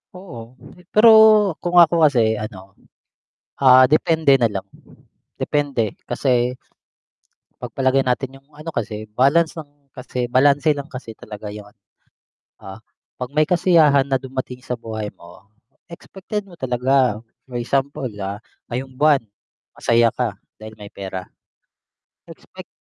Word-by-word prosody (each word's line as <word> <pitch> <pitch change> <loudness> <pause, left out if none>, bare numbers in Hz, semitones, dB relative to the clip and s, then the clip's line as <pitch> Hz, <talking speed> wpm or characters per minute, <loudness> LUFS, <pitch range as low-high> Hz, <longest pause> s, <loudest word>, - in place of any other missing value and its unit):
Oo, 180 -10 -10 0.4
pe 180 - -18
pero 220 +2 +7 0.5
kung 175 0 -3
ako 170 0 +4
kasi 115 -6 +2
ano, 95 -3 -10 0.9
ah, 130 -1 +7
depende 160 -1 +2
nalang, 110 -7 0 0.7
depende 145 -4 -1 0.3
kasi 125 0 0 1.0
'pagpalagay 135 0 0
natin 135 +2 -2
'yong 135 - -36
ano 155 +2 -8
kasi, 110 -7 -4
balance 140 +8 +2
lang 155 - -9 0.2
kasi, 125 -1 -5
balanse 145 +4 +3
lang 145 -1 -4
kasi 130 -6 -9
talaga 105 -1 -10
yung 105 0 -10
ano, 105 +1 -23 0.8
ah, 95 +1 -10 0.4
'pag 125 +1 -7
may 155 +1 +1
kasiyahan 165 -6 +4
na 135 -1 -1
dumating 130 -1 -6
sa 125 -1 -5
buhay 110 -2 -6
mo, 90 +4 -17 0.4
expected 190 +4 -7
mo 195 - -18
talaga, 130 -4 0 0.3
for 125 - -7
example, 135 +1 -2
ah, 100 +3 -6 0.2
ngayong 130 +2 -5
buwan 140 -1 +2 0.5
masaya 115 -1 +2
ka 115 -5 -3 0.2
dahil 110 0 -11
may 105 -1 -12
pera. 95 -1 -7 1.0
Expect - - -13
130 Hz, 130 wpm, -20 LUFS, 115-145 Hz, 1.0 s, pero